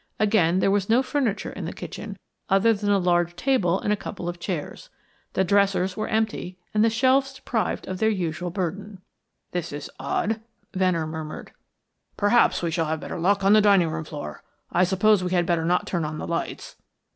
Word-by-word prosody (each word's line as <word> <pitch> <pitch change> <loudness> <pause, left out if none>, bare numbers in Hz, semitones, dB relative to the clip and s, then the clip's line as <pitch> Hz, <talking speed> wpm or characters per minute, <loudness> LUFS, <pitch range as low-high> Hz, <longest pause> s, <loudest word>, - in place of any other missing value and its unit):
Again, 200 -5 +3
there 195 - +3
was 200 0 0
no 240 +4 +4
furniture 260 -7 -1
in - - -6
the - - -4
kitchen - - -7 0.3
other 200 +4 +4
than 205 -1 -2
a 200 - +4
large 175 -2 +1
table 190 -5 +1
and 210 - 0
a - - +2
couple 200 -3 -7
of 175 0 -4
chairs. 170 -4 -5 0.4
The 190 - +2
dressers 195 -1 +2
were 215 - -3
empty, 215 -4 -1 0.2
and 215 0 +3
the 230 - +5
shelves 265 +4 +2
deprived 235 -4 -2
of 185 -1 -4
their 220 - +3
usual 175 -3 -2
burden. 190 +2 -4 0.5
"This 175 -2 -3
is 145 0 -7
odd," 215 +11 -1 0.3
Venner 185 -4 +1
murmured. 155 -1 -7 0.7
"Perhaps 205 -2 +3
we 170 - 0
shall 165 -1 0
have 160 0 -1
better 170 - -6
luck 195 +3 +2
on 195 +1 +5
the 215 - +7
dining 195 -5 +4
room 160 0 -3
floor. 145 - -7 0.3
I 180 +2 +3
suppose 190 +2 +3
we 180 0 -2
had 175 -1 +2
better 165 -1 +1
not 180 +2 +1
turn 175 -3 -2
on 155 0 -4
the - - -5
lights!" 170 0 -4
185 Hz, 195 wpm, -25 LUFS, 170-210 Hz, 0.7 s, the